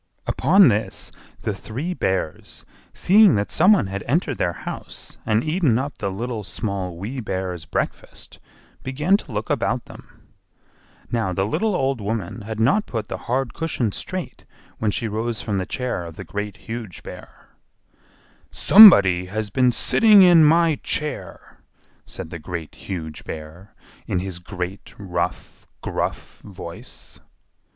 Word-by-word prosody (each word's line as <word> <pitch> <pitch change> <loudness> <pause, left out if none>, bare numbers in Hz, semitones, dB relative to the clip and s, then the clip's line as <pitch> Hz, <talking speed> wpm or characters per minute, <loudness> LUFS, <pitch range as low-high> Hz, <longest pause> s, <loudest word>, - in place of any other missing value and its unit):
Upon 190 +2 +5
this 100 -2 -2 0.3
the 105 - -2
three 130 - -5
Bears, 95 - -3 0.3
seeing 205 0 +5
that 100 0 -1
some 180 +6 +5
one 195 - +2
had 95 0 -5
entered 145 0 0
their 85 - 0
house - - -8
and 110 +1 +2
eaten 155 -7 +1
up 135 0 -4
the 100 - -2
Little, 110 +3 -4
Small, 95 -2 -4
Wee 110 +9 -5
Bear's 95 -6 -4
breakfast, - - -5 0.4
began 150 +9 +1
to - - -11
look - - -3
about - - -1
them. - - -16 0.8
Now 110 -6 0
the 95 +2 0
little 210 - 0
old 135 -6 0
woman 105 0 -4
had 110 +1 -6
not 145 - +2
put 110 -3 -4
the - - -4
hard 130 0 0
cushion 150 -9 -2
straight 185 - -6 0.4
when 110 - +1
she 115 +3 -2
rose 110 +1 -3
from 100 -3 -1
the 95 - -4
chair 125 -8 -3
of 80 - -10
the - - -8
Great, 105 -1 -5
Huge 115 -5 -7
Bear. - - -12 1.0
"SOMEBODY 100 - +8
HAS 105 +2 -4
BEEN 125 +2 +3
SITTING 210 - +5
IN 175 -3 +7
MY 165 0 +4
CHAIR!" 150 0 -4 0.5
said 80 - -8
the 85 - -6
Great, 85 -1 -6
Huge 80 -5 -7
Bear, 80 +7 -9 0.3
in - - -1
his 90 -1 -4
great, 90 +1 -7
rough, 95 -4 -4
gruff - - -4
voice. 90 -4 -11
110 Hz, 145 wpm, -22 LUFS, 95-140 Hz, 1.0 s, SOMEBODY